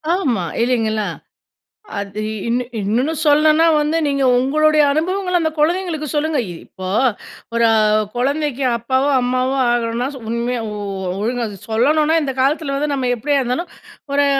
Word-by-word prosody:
ஆமா, 250 - 0 0.2
இல்லைங்களா? 220 -4 0 0.9
அது 200 +1 -5 0.3
இன்னு 245 +2 0 0.2
இன்னொன்னு 240 +10 0
சொல்லணுனா 310 +2 +4
வந்து, 300 +2 0
நீங்க 275 -1 0
உங்களுடைய 305 +4 +3
அனுபவங்கள 360 +4 -1
அந்த 320 -1 0
குழந்தைங்களுக்கு 325 0 0
சொல்லுங்க. 305 0 0
இ - - -5
இப்போ 185 0 -8 0.7
ஒரு 235 0 +2
அ, - - +4 0.4
குழந்தைக்கு 280 +1 -1
அப்பாவோ, 260 +4 0
அம்மாவோ 255 +2 0
ஆகணும்னா 240 +1 0
சு 265 - -9
உண்மையா 235 +1 -1
ஓ 210 - -6 0.5
ஒழுங்கா 235 +2 -1 0.2
சொல்லணுனா, 300 +8 +2
இந்த 270 -2 -2
காலத்துல 275 +1 +1
வந்து 290 +1 -1
நம்ம 255 -2 -1
எப்படியா 285 +5 0
இருந்தாலும், 255 +8 -3 0.4
ஒரு 285 0 +3
270 Hz, 140 wpm, -19 LUFS, 240-305 Hz, 0.9 s, சொல்லணுனா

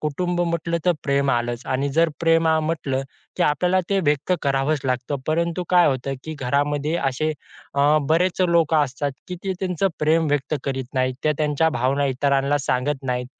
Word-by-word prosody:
कुटुंब 175 +4 -1
म्हटलं 170 -1 -1
तर 180 - +4
प्रेम 140 -1 +1
आलंच 120 0 -1
आणि 135 +2 0
जर 165 0 +5
प्रेमा 165 -1 +3
म्हटलं, 155 -4 -2 0.3
की - - +1
आपल्याला 180 +5 +2
ते 195 - +2
व्यक्त 145 +4 +1
करावंच 140 +2 +1
लागतं. 130 +2 -1
परंतु 170 +3 0
काय 180 -1 +6
होतं, 135 0 -1
की 155 0 -5
घरामध्ये 145 +3 0
असे 140 +1 -1 0.4
अ, 145 +2 +4
बरेच 175 +3 +2
लोकं 165 -2 +3
असतात, 140 +1 -3 0.2
की 180 - -4
ते 190 - 0
त्यांचं 185 0 0
प्रेम 160 +1 +2
व्यक्त 145 +1 0
करीत 135 -1 -2
नाहीत, 130 0 +1
ते 155 - +3
त्यांच्या 150 +1 +2
भावना 135 +3 +1
इतरांना 140 +2 +1
सांगत 135 +2 0
नाहीत. 125 0 -1
145 Hz, 170 wpm, -22 LUFS, 135-165 Hz, 0.4 s, काय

